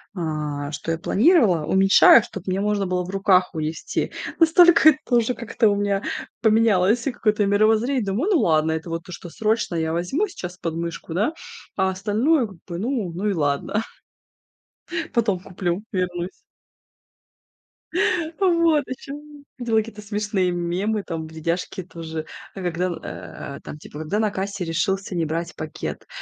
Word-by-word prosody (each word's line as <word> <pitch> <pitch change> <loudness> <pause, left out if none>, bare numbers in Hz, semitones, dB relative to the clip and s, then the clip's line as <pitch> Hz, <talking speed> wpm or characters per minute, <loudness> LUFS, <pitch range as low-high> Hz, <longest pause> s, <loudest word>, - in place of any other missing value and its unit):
а, 150 -3 -3
что 150 +2 -4
я 165 - -1
планировала, 210 - +3
уменьшаю, 195 +5 +7
чтоб 195 -2 -9
мне 185 +1 0
можно 210 -1 0
было 180 0 0
в 180 - -8
руках 195 -2 +3
унести. 155 -1 -3 0.3
Настолько 330 0 +7
это 275 -3 0
уже 235 +1 +2
как-то 235 -1 +1
у 205 - +2
меня 200 -1 0 0.4
поменялось 220 -1 +3
какое-то 215 -5 +1
и - - +2
мировоззрение. 220 +5 +2
Думаю, 215 - 0
ну 330 - +4
ладно, 160 -1 +2
это 160 +1 -3
вот 165 0 -3
то, 180 - -10
что 175 0 -8
срочно 215 -1 0
я 160 0 -1
возьму 265 - 0
сейчас 180 - -8
под 165 -3 -4
мышку, 170 0 -5
да, 210 - +1 0.4
а 190 -1 +2
остальное 220 - +1
как 195 -4 -14
бы, 170 -2 -5
ну 220 -5 -2
ну 195 +5 -2
и 205 - +2
ладно, 150 +6 0 1.3
потом 215 -6 +1
куплю, 180 0 -3
вернусь. 180 -1 -3 2.0
А 390 - +3
вот, 335 -4 +4
о 260 - -3
чём 290 +1 -10
видела 235 -3 0
какие-то 215 -1 -2
смешные 205 -3 -1
мемы, 185 +5 -1
там, 160 -3 -5
видяшки 165 +3 -3
тоже, 160 -2 -6 0.3
а, 195 - -6
когда, 175 0 -1 0.7
э, - - -13
там, 150 - -8
типа, 150 - -10
когда 160 +7 -1
на 215 -2 +1
кассе 195 -1 -3
решился 190 +3 -1
не 165 - 0
брать 165 +2 -3
пакет, 155 0 -6
195 Hz, 160 wpm, -23 LUFS, 170-220 Hz, 2.0 s, уменьшаю